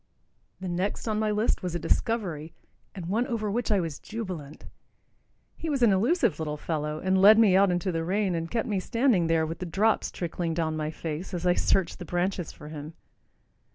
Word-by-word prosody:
The 190 - -5
next 180 +6 -2
on 215 -1 0
my 215 0 +1
list 210 +2 +1
was 180 -2 -3
a - - +2
discovery, 165 -3 -1 0.4
and 185 -4 -6
one 220 +8 0
over 220 -5 -2
which 235 +1 -1
I 205 - +4
was 165 -5 -4
jubilant. 185 -10 -7 0.9
He 325 - -5
was 275 -4 +1
an 230 - +6
elusive 230 - +2
little 150 -1 -3
fellow, 150 -1 -3
and 190 +3 +1
led 210 +2 +9
me 215 -5 +5
out 195 0 +5
into 175 +1 0
the 165 -1 -2
rain 190 +2 0
and 165 0 -3
kept 230 -1 -1
me 205 -4 0
standing 230 -4 +2
there 165 -1 +2
with 165 +1 -5
the 180 - -4
drops 210 +6 +1
trickling 170 -1 -3
down 160 -2 -1
my 155 -1 -2
face 165 +4 -5
as 175 0 -4
I 180 - +5
searched 190 0 +1
the 175 - -6
branches 175 0 -1
for 150 - -11
him. 155 +1 -8
180 Hz, 205 wpm, -27 LUFS, 165-215 Hz, 0.9 s, led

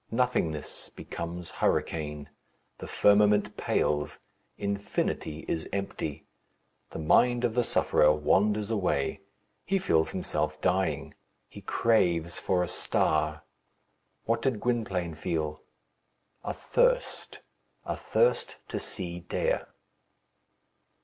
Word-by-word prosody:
Nothingness 115 - -1
becomes 85 0 -6
hurricane. 75 -2 -1 0.5
The - - -7
firmament 105 0 +4
pales. 75 -1 0 0.4
Infinity 100 -6 -2
is 80 -1 -2
empty. 95 -6 -4 0.6
The - - -7
mind 120 +10 +3
of 120 -2 +1
the 120 +1 +2
sufferer 75 -8 +4
wanders 105 +8 +2
away. 90 -10 0 0.4
He 195 - +1
feels 80 - +2
himself 75 -4 -2
dying. 90 -3 0 0.3
He - - -11
craves 85 -7 +1
for 90 -1 +1
a - - -2
star. 75 -1 +1 0.8
What 115 0 +1
did 130 -6 0
Gwynplaine 100 -9 -1
feel? 80 -2 -3 0.8
a - - -3
thirst - - +1 0.4
a - - -2
thirst 485 0 +1
to - - -2
see 85 -1 -4
Dea. 90 - 0
90 Hz, 105 wpm, -29 LUFS, 80-110 Hz, 0.8 s, firmament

